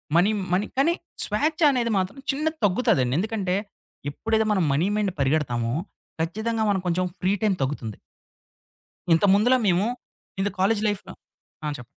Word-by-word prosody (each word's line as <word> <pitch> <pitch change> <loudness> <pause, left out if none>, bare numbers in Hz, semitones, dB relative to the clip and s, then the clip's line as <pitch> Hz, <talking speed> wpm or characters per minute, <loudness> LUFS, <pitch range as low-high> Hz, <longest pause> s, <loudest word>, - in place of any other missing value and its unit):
Money 180 +4 +5 0.2
money 190 +3 +2
కానీ 320 +6 +4 0.3
స్వేచ్ఛ 305 +10 0
అనేది 240 -3 0
మాత్రం 185 +7 -2
చిన్న 300 +3 -2 0.2
తగ్గుతదండి. 180 - +2
ఎందుకంటే, 200 -3 -1 0.6
ఎప్పుడైతే 220 +7 0
మనం 190 -4 +2
మనీ 155 +7 +2
మెండ్ 200 -3 0
పరిగెడతామో, 125 -5 0 0.5
ఖచ్చితంగా 220 +6 -1
మనం 195 - +2
కొంచెం 180 +1 +1
ఫ్రీ 190 +2 +1
టైమ్ 200 -3 +3
తగ్గుతుంది. 130 -6 -3 1.2
ఇంతకుముందులా 205 +8 +4
మేము, 185 +2 +3 0.6
ఇది 205 - +1
కాలేజు 205 +2 +2
లైఫ్‌లో 205 -2 -5 0.5
ఆ! - - 0
చెప్పండి. 120 - -9
195 Hz, 135 wpm, -25 LUFS, 170-220 Hz, 1.2 s, మనీ